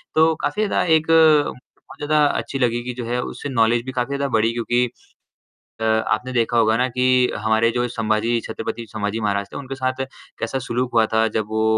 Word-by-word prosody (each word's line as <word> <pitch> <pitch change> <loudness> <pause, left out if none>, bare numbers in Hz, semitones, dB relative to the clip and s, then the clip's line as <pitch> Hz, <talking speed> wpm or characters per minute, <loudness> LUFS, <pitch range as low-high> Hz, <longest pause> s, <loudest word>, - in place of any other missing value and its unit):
तो 160 +1 +5
काफ़ी 145 +9 -1
ज़्यादा - - +1
एक 160 0 0
बहुत 155 -5 +2
ज़्यादा 150 0 +4
अच्छी 140 -1 -2
लगी 120 -2 +1
कि 125 0 -4
जो 120 -1 -6
है 120 +2 -1
उससे 145 - -6
नॉलेज 115 -2 +2
भी 130 - -4
काफ़ी 130 +2 -2
ज़्यादा 140 0 -1
बढ़ी 110 +1 +3
क्योंकि 120 +1 +1 1.0
अ, - - -2
आपने 110 +2 0
देखा 120 -1 +1
होगा 110 -1 +3
ना 125 +2 +1
कि 125 0 +2
हमारे 110 +2 +2
जो 120 +1 -1
संभाजी 115 0 0
छत्रपति 115 0 -5
संभाजी 105 +1 -3
महाराज 100 -1 -1
थे - - -7
उनके 135 -1 -6
साथ 130 0 -2 0.3
कैसा 135 - -2
सुलूक 125 +1 -1
हुआ 115 -1 +4
था 110 0 +3
जब 110 - -2
वो 110 0 0
120 Hz, 200 wpm, -21 LUFS, 110-130 Hz, 1.0 s, तो